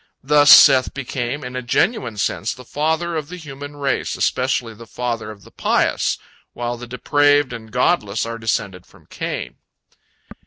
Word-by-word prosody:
Thus 145 +1 +4
Seth 135 -4 +8
became, 135 +1 -4
in 125 0 -7
a 125 - -2
genuine 120 - 0
sense, 100 +1 -1
the 125 - -13
father 160 +5 -1
of 155 -2 -4
the 180 - -7
human 145 -2 -9
race, 140 -1 -2
especially 125 -3 0
the 115 +2 -13
father 120 -2 -4
of 100 -2 -11
the - - -17
pious, - - 0 0.4
while 120 0 -3
the 120 +1 -9
depraved 145 +2 +2
and 110 -2 -9
godless 115 - +1
are 115 0 -6
descended 100 -5 -3
from - - -21
Cain. - - -5
125 Hz, 160 wpm, -20 LUFS, 115-145 Hz, 0.4 s, Seth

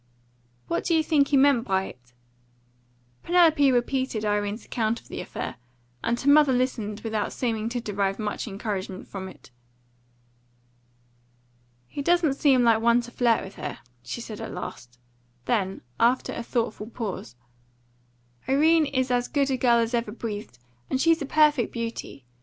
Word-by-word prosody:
"What 170 - -1
do 335 - +2
you 320 - +3
think 295 -3 +3
he 280 - +3
meant 270 -3 +4
by 190 -1 +1
it?" 125 -6 -12 1.1
Penelope 320 -6 +4
repeated 245 -2 0
Irene's 205 +1 -1
account 230 0 -1
of - - -22
the - - -5
affair, - - -6 0.5
and 235 +1 0
her 280 - +1
mother 295 -2 +6
listened 230 -5 -1
without 220 -2 -2
seeming 225 -3 -2
to 245 +1 -2
derive 200 -3 -1
much 210 +1 -3
encouragement 195 -2 -5
from 190 -1 -6
it. 155 - -16 2.4
"He 285 - -5
doesn't 340 -1 +3
seem 275 -3 +3
like 225 -2 +4
one 235 +1 +4
to 240 0 -10
flirt 240 -2 +2
with 195 - -10
her," - - -5 0.2
she 125 - -6
said 215 -2 -7
at - - -6
last. 120 0 -8 0.5
Then, 195 -5 0 0.2
after 245 +3 +2
a - - -4
thoughtful 230 -2 -2
pause: 200 - -5 1.1
"Irene 310 +3 +4
is 260 -2 -1
as 245 0 +1
good 280 -2 0
a - - +2
girl 240 -2 +4
as 230 +1 0
ever 235 -3 0
breathed, 210 - -6 0.3
and 260 - 0
she's 330 +2 +3
a 280 - -3
perfect 295 -6 +3
beauty. 230 - -6
235 Hz, 160 wpm, -26 LUFS, 210-270 Hz, 2.4 s, mother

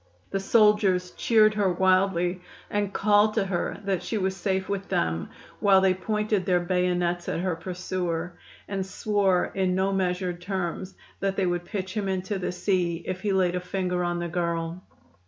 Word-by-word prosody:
The 195 - 0
soldiers 195 -3 +3
cheered 215 -2 +4
her 205 -3 +1
wildly, 185 -1 +2 0.3
and 205 -1 0
called 210 +1 +3
to 215 -4 +2
her 185 -2 -2
that 195 -3 0
she 225 - -3
was 190 -1 -1
safe 190 0 -1
with 200 -1 -3
them, 80 -1 -1 0.3
while 195 -2 +5
they 190 -1 +4
pointed 210 +1 -1
their 180 0 +2
bayonets 175 -1 0
at - - -1
her 185 -2 0
pursuer 175 0 -3 0.3
and 195 -1 -2
swore 195 -1 +1
in 185 -1 +1
no 190 +1 +1
measured 180 -2 -1
terms 185 0 -4 0.2
that 195 0 -1
they 195 - +1
would 175 -1 -1
pitch 185 0 -4
him 205 -2 -2
into 190 +1 -2
the 180 - -2
sea 180 -2 0
if 185 0 -4
he 205 - 0
laid 185 -2 +2
a - - 0
finger 180 -1 -2
on 175 0 -1
the 175 0 -2
girl. 170 0 -2
185 Hz, 175 wpm, -26 LUFS, 180-195 Hz, 0.3 s, while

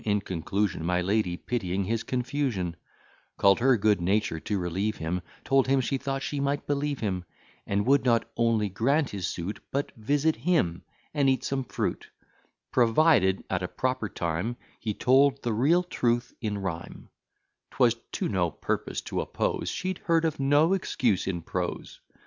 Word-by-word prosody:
In 105 -1 +1
conclusion, 95 +1 -2
My 90 +1 +1
lady, 95 -1 0
pitying 95 -5 -2
his 110 +4 -1
confusion, 125 -9 -2 0.6
Call'd 100 0 +5
her 130 0 +4
good 105 -2 +2
nature 95 -2 +1
to 105 +5 -2
relieve 95 +4 -1
him; 85 +3 -2 0.2
Told 135 -1 +3
him, 135 0 +3
she 130 +1 -1
thought 135 0 -3
she 145 - -3
might 140 +1 -1
believe 145 -1 -1
him; 95 -5 -1 0.4
And 100 +1 0
would 140 +3 +4
not 115 -3 +2
only 115 -3 +2
grant 135 - +1
his 95 -4 -3
suit, 90 +5 -4
But 140 +1 -2
visit 145 +8 +1
him, 120 - +1 0.3
and 140 -2 +3
eat 130 - +1
some 135 -1 -1
fruit, - - -3 0.6
Provided, 115 - +4
at 95 -1 -1
a 90 - -2
proper 130 -2 -2
time, 85 +9 -2 0.2
He 105 -3 -3
told 135 +2 +4
the 120 - 0
real 150 +11 +3
truth 120 -8 0
in 105 -3 -2
rhyme; 90 -4 -6 0.6
'Twas 120 -2 +3 0.2
to - - -1
no 90 -4 +1
purpose - - -3
to - - -3
oppose, - - -2
She'd 185 0 -3
hear 165 -1 +4
of 160 -3 0
no 145 +6 +4
excuse 120 - 0
in 85 -3 -2
prose. 90 0 -4
115 Hz, 165 wpm, -27 LUFS, 95-135 Hz, 0.6 s, Call'd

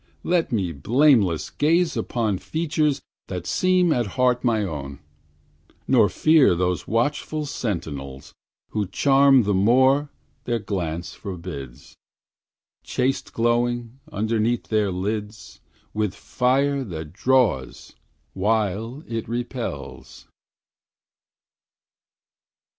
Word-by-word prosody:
let 175 -2 +1
me 95 -7 0
blameless 100 - +2
gaze 165 +2 +2
upon 110 -5 -1
Features 155 -3 -1 0.2
that 90 -2 -5
seem 180 - +2
at 120 -5 0
heart 125 -1 +2
my 115 -4 +2
own; 70 -6 -5 0.9
Nor - - +4
fear 155 - +4
those 90 0 -1
watchful 145 +6 -1
sentinels, 70 - -5 0.4
Who 105 -2 -1
charm 135 +4 +4
the 100 0 0
more 130 +8 +3 0.4
their 120 -1 0
glance 85 -6 -4
forbids, 85 - -8 0.9
Chaste 135 +2 -1
glowing, 120 +1 0
underneath 110 +3 -1
their 105 -3 +1
lids, 105 +3 -5 0.3
With 105 -3 -1
fire 135 +2 0
that 80 -8 -7
draws 115 - 0 0.4
while 110 - -1
it 115 -1 -4
repels. 115 - -6
115 Hz, 95 wpm, -23 LUFS, 90-130 Hz, 0.9 s, Nor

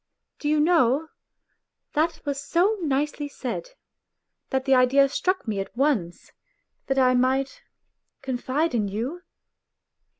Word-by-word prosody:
' - - -54
Do 295 - -2
you 305 0 +3
know, 310 -2 +3 0.8
that 320 +3 0
was 280 -1 -2
so 355 +9 +2
nicely 290 -1 -1
said, 280 - -5 0.8
that 265 0 -1
the 270 - +3
idea 265 +2 +5
struck 370 +3 -1
me 210 -3 -1
at 195 +4 -6
once, 250 - -1 0.6
that 270 - 0
I 255 -1 +4
might 265 - +1 0.6
confide 265 +5 -1
in 215 -4 +1
you 240 - -4
275 Hz, 130 wpm, -25 LUFS, 255-305 Hz, 0.8 s, idea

